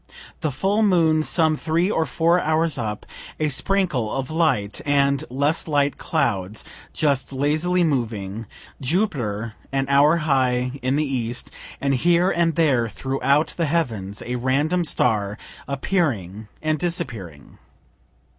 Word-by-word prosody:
The 155 - -1
full 195 - 0
moon, 165 -6 +3
some 160 0 +2
three 170 +5 0
or 160 - 0
four 170 +2 +2
hours 160 -1 +1
up 105 -2 -4 0.3
a 155 -1 +1
sprinkle 145 - 0
of 135 +1 -3
light 155 -11 0
and 140 -1 +2
less 145 +7 0
light 145 -2 +1
clouds 105 - -1 0.3
just 140 -4 0
lazily 155 +6 +1
moving 115 - -2 0.3
Jupiter 125 - -1 0.2
an 135 0 0
hour 145 +4 +5
high 130 -2 +1
in 130 +2 0
the 155 +1 +1
east, 125 -3 -3 0.3
and 140 0 0
here 175 +7 +3
and 170 -2 +1
there 135 -8 +2
throughout 135 +6 0
the 170 - +1
heavens 110 - -2
a 125 +1 -2
random 145 +8 +1
star 105 -8 +1 0.3
appearing 120 - -1 0.2
and 155 -1 0
disappearing. 115 - -4
140 Hz, 130 wpm, -22 LUFS, 120-160 Hz, 0.3 s, hour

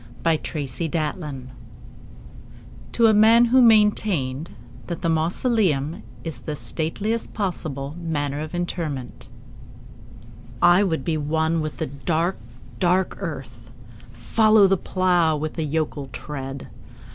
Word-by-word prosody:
The 165 - +3
Traveller 155 +1 -3
heart 150 -5 -5 1.6
(To 230 - +3
a 220 - +6
Man 225 +3 +6
who 255 +2 +5
maintained 205 - +3 0.4
that 170 0 -5
the 165 - +1
Mausoleum 165 - +1 0.2
is 165 -2 -5
the 150 - -4
Stateliest 200 +10 -3
Possible 155 -8 -3
Manner 145 -4 -2
of 155 +3 -5
Interment) 160 -9 -4 1.3
I 175 +7 +6
would 160 -9 -1
be 160 -2 0
one 160 +2 0
with 155 -1 -4
the - - -2
dark, 155 +7 -1 0.4
dark 185 0 +1
earth:— 130 - -7 0.4
Follow 215 - +4
the 195 0 +4
plough 180 -4 +1
with 155 +1 -4
a - - +1
yokel 150 -2 -2
tread. 135 +2 -7
160 Hz, 120 wpm, -23 LUFS, 145-185 Hz, 1.6 s, a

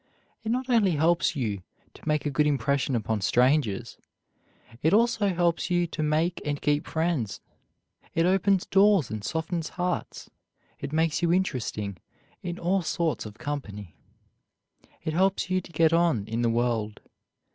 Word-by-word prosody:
It 220 - -1
not 255 +2 -1
only 220 -8 +3
helps 165 +2 +2
you 105 -8 -2 0.3
to - - -16
make 150 -1 +1
a 145 - 0
good 150 +2 +2
impression 140 -1 +1
upon 110 -2 -1
strangers, 125 -1 +1 0.8
it 160 +6 +4
also 230 -2 +3
helps 175 -1 0
you 175 -1 +2
to 165 -1 -5
make 155 +3 0
and 145 -1 -2
keep 145 0 0
friends. 160 - -1 0.8
It 165 - +3
opens 190 +1 +2
doors 195 - +4
and 110 -1 -4
softens 160 - -2
hearts. 180 0 -3 0.5
It - - -5
makes 160 +1 +1
you 170 -1 +2
interesting 115 - -1 0.4
in 175 -1 -5
all 185 +3 +1
sorts 165 -6 -1
of 105 +1 -12
company. 105 - -6 1.1
It 155 - -2
helps 190 +2 +1
you 185 0 +2
to 175 - -14
get 160 0 +3
on 165 -11 +2
in 115 +2 -2
the 120 - +2
world. 115 -2 -1
160 Hz, 155 wpm, -27 LUFS, 125-180 Hz, 1.1 s, it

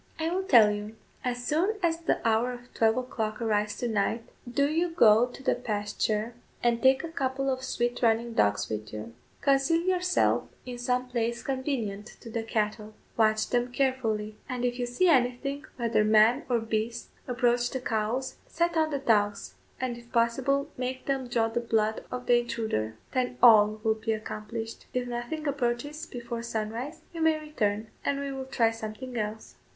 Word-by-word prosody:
"I 320 +1 -1
will 370 +2 0
tell 235 - +6
you; 210 +1 -5 0.3
as 245 -1 -2
soon 355 +8 +1
as 330 -1 +2
the 330 -7 0
hour 230 +3 +2
of 245 0 -12
twelve 225 +1 +3
o'clock 225 -4 -3
arrives 210 -2 0
to 245 - -2
night, 220 +1 0 0.3
do 280 +3 +2
you 330 +4 +1
go 235 -8 +5
to 250 +2 -12
the - - +3
pasture, 215 0 -2 0.3
and 235 -1 +2
take 265 0 +5
a - - -3
couple 270 -2 -1
of 260 0 -2
swift 240 -2 -1
running 230 0 +2
dogs 105 - +2
with 110 0 -5
you; 110 +1 -7 0.3
conceal 280 +4 +3
yourself 365 0 +2 0.2
in 245 -1 -6
some 250 +1 0
place 235 -1 -2
convenient 255 -7 -2
to 230 - -9
the 230 - -1
cattle; 215 -1 -2 0.2
watch 215 -1 +3
them 245 0 +1
carefully; 230 -5 0
and 250 -1 -2
if 245 0 -1
you 245 - -1
see 245 +10 +2
anything, 275 0 +1
whether 235 -3 +2
man 220 +6 +5
or 245 - +3
beast, 225 +1 -3 0.2
approach 245 -1 +2
the 260 - -3
cows, 230 +2 -2
set 340 +1 0
on 315 -1 +3
the 290 - -1
dogs, 205 -6 +1 0.3
and 245 -2 -3
if 235 0 -18
possible 265 +4 +1
make 255 +1 -3
them 270 -2 -1
draw 235 -2 +1
the 225 +1 -1
blood 220 -2 0
of 250 0 -4
the 240 0 +5
intruder; 220 - -2 0.2
then 250 -1 -1
ALL 215 -2 +7
will 220 -1 +3
be 220 +1 -2
accomplished. 220 +1 -6
If 250 -1 0
nothing 245 +6 -4
approaches 280 +2 -2
before 235 -1 -5
sunrise, 235 +6 -4
you 330 - -5
may 320 -1 +3
return, 220 -8 -2
and 280 0 0
we 280 0 -3
will 270 -1 -5
try 230 -3 +2
something 225 +3 -7
else." 215 -1 -4
240 Hz, 180 wpm, -28 LUFS, 220-265 Hz, 0.3 s, ALL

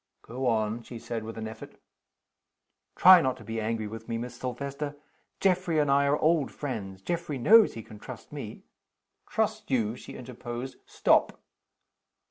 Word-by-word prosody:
"Go 130 +2 -3
on," 110 0 +1
she 120 +1 -9
said, 115 0 -5
with 110 +1 -7
an 110 0 -4
effort. 110 - -10 1.2
"Try 185 -1 +9
not 130 -2 0
to - - -12
be 115 -1 -4
angry 110 0 -2
with 110 +1 -8
me, 115 - -1
Miss 120 +2 -5
Silvester. 140 +4 -5 0.4
Geoffrey 185 -3 +2
and 145 -2 +3
I 140 0 +4
are 145 +1 +3
old 155 -2 +2
friends. 100 -9 -5
Geoffrey 170 - -2
knows 215 - +6
he 115 - -6
can 105 0 -12
trust - - -10
me - - -7 0.3
" - - -36
"Trust 215 0 -1
you?" 115 -4 +1
she - - -10
interposed. 125 0 -7
"Stop!" - - +2
125 Hz, 165 wpm, -28 LUFS, 115-150 Hz, 1.2 s, Try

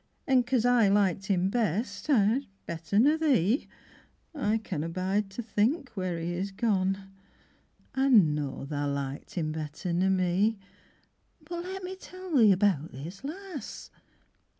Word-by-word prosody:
An' 260 -2 +4
cos 245 -1 0
I 245 -3 +5
liked 195 -1 +2
him 190 -1 +1
best, 210 - -1
yi, 235 0 +3 0.2
bett'r 170 +4 -1
nor 295 +7 +4
thee, 260 - +2 0.7
I 225 -8 +1
canna 165 -7 -4
bide 190 +4 -1
to 205 +5 -6
think 235 +7 0
where 185 -5 -3
he 165 +1 -3
is 190 +3 -2
gone. 195 -2 -1 0.8
Ah 270 +1 +2
know 150 - +3
tha 145 0 -2
liked 140 +3 -4
'im 155 -3 0
bett'r 155 +3 -4
nor 185 +3 +2
me. 190 +4 +2 0.9
But 345 +2 -6
let 380 +1 -6
Me 370 +1 -5
tell 370 -2 -7
thee 225 -6 +7
about 185 -6 +2
this 165 - -9
lass. 345 +1 -7
200 Hz, 145 wpm, -29 LUFS, 175-255 Hz, 0.9 s, thee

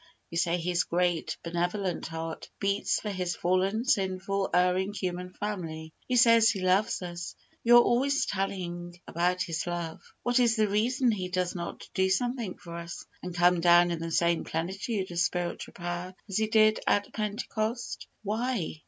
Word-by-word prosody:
You 170 - -3
say 175 0 +2
His 175 +1 0
great, 175 -1 0
benevolent 175 +2 -2
heart 165 0 -6
beats 200 0 +1
for 210 - -4
His 180 -3 -2
fallen, 190 +7 +1
sinful, 195 -2 0
erring 180 +3 +2
human 180 -2 -3
family. 165 -7 -5
You 250 - +2
say 230 -1 +7
He 225 -2 +4
loves 185 +1 +2
us. 175 0 -6 0.3
You 240 +1 +8
are 240 - +8
always 275 +3 +2
telling 175 -3 -3
about 180 +2 +1
His 165 0 -3
love. 170 -2 -4 0.2
What 245 +1 +2
is 235 -2 +4
the 215 -2 +3
reason 240 +5 +2
He 185 -4 -3
does 180 -1 -1
not 170 -1 -6
do 190 0 +2
something 235 0 -1
for 170 -1 -9
us, 170 0 -7 0.2
and 180 -1 -6
come 175 0 +4
down 175 0 +6
in 170 - -2
the 165 0 -4
same 170 0 +2
plentitude 190 +4 -3
of 170 - -2
spiritual 175 0 -1
power 175 +1 -5
as 195 - -2
He 220 0 +2
did 215 0 +4
at 205 0 +1
Pentecost? 215 +2 -3 0.2
Why? 215 -5 -2
185 Hz, 170 wpm, -29 LUFS, 175-210 Hz, 0.3 s, You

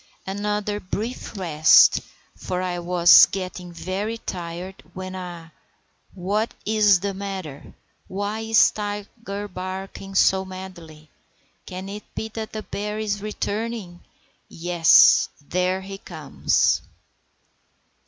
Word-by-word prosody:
Another 205 +1 -2
brief 215 +4 -5
rest, 155 -4 +6 0.3
for 180 0 -3
I 180 -1 -2
was 175 0 +7
getting 185 -2 -6
very 190 +6 -3
tired, 180 -2 -6
when—ah, 180 -3 -7 0.6
what 205 +5 -1
is 210 -3 +4
the 200 -1 -2
matter? 190 -7 -7 0.3
Why 205 +3 -3
is 225 0 +4
Tiger 205 0 -5
barking 190 +1 -7
so 190 0 +4
madly? 175 -5 -10 0.6
Can 185 0 -7
it 205 +1 -9
be 220 - -4
that 220 0 -6
the 215 -1 -5
bear 210 +1 -4
is 205 -2 -2
returning? 210 -3 -4 0.5
Yes, 170 -1 +5 0.2
there 185 +1 0
he 195 0 -8
comes! 155 -7 0
190 Hz, 105 wpm, -23 LUFS, 180-210 Hz, 0.6 s, was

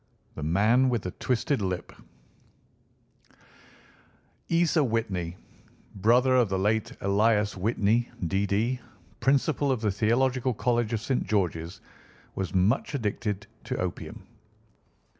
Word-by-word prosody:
THE - - -8
MAN 105 - +3
WITH 120 -4 -1
THE 90 - -4
TWISTED 130 - -1
LIP 95 -2 -3 2.6
Isa 165 -2 +3
Whitney, 95 -8 -2 0.6
brother 120 +6 +4
of 120 -5 +3
the 95 - 0
late 105 +3 0
Elias 105 +1 +2
Whitney, 110 +4 +1 0.2
D.D., 100 +7 0 0.4
Principal 140 +1 +2
of 125 -4 -1
the 105 -2 +1
Theological 125 +4 +1
College 120 -1 0
of 115 -2 -1
St. 130 +2 -1
George's, 90 -4 -1 0.5
was 95 -2 -3
much 100 +10 +1
addicted 105 -4 -2 0.2
to 130 +1 -3
opium. 90 -1 -5
110 Hz, 110 wpm, -27 LUFS, 95-125 Hz, 2.6 s, brother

